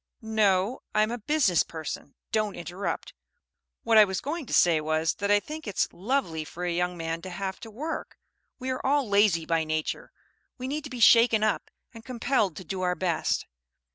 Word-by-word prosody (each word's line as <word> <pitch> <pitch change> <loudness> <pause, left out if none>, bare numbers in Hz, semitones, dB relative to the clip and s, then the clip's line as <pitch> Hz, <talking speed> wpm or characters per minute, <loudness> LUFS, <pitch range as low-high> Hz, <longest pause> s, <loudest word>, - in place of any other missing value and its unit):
"No 215 +1 +1
I'm 215 +1 +3
a 240 - -3
business 225 - +3
person. 160 -3 -6 0.2
Don't 215 -2 0
interrupt. 180 +3 -4 0.7
What 225 -1 +5
I - - +10
was 190 -2 -1
going 305 -1 -4
to - - -9
say 165 -3 +5
was, 155 +1 +1
that 200 0 -3
I 205 0 +5
think 305 +4 -8
it's 205 - -1
lovely 190 - -1
for 175 +3 -6
a 175 - 0
young 180 0 -1
man 165 0 -3
to 185 - -7
have 190 +1 -4
to 225 - -9
work! 295 +10 -5 0.4
We 260 0 -3
are 255 - -4
all 280 -1 +2
lazy 200 -5 +3
by 165 -1 +1
nature; 155 0 -3 0.5
we 255 -1 -5
need 295 +2 -3
to - - -6
be 250 -2 -7
shaken 230 -1 +6
up 215 -1 0 0.2
and 230 -1 -11
compelled 235 - 0
to - - -7
do 185 +3 -4
our 180 -1 +1
best. 180 -3 0
205 Hz, 195 wpm, -27 LUFS, 175-240 Hz, 0.7 s, I